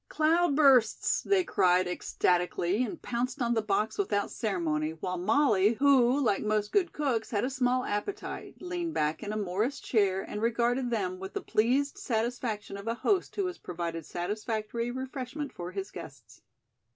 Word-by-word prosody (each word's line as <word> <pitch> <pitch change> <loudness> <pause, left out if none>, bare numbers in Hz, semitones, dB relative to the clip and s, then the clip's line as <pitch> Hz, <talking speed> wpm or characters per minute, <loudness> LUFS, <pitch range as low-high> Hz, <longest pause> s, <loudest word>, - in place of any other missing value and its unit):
"Cloudbursts!" 305 -7 +3
they 395 -2 +2
cried 185 - +3
ecstatically 180 +3 0
and 325 +7 -5
pounced 245 +3 -2
on 240 -2 +1
the 225 - +1
box 215 - -1
without 205 - 0
ceremony, 160 -7 -1
while 180 +2 -4
Molly, 215 0 +3
who, 265 0 +4
like 220 -8 +1
most 210 -1 0
good 370 -4 +2
cooks, 255 -7 -1
had 205 -2 0
a 265 - -2
small 255 -1 +1
appetite, 315 - -4
leaned 350 -2 -3
back 150 +1 0
in 210 -2 -4
a 215 - -2
Morris 210 +7 -1
chair 195 -4 +1
and 210 - -6
regarded 240 +2 +1
them 185 -6 -2
with 190 0 -7
the - - -3
pleased 260 +6 +1
satisfaction 225 -3 -2
of 200 +2 -9
a 230 - 0
host 370 - 0
who 400 - 0
has 360 -1 -4
provided 170 -2 -4
satisfactory 215 +7 -3
refreshment 260 +3 -5
for 175 0 -6
his 195 +1 -5
guests. - - -11
225 Hz, 165 wpm, -29 LUFS, 195-265 Hz, -, who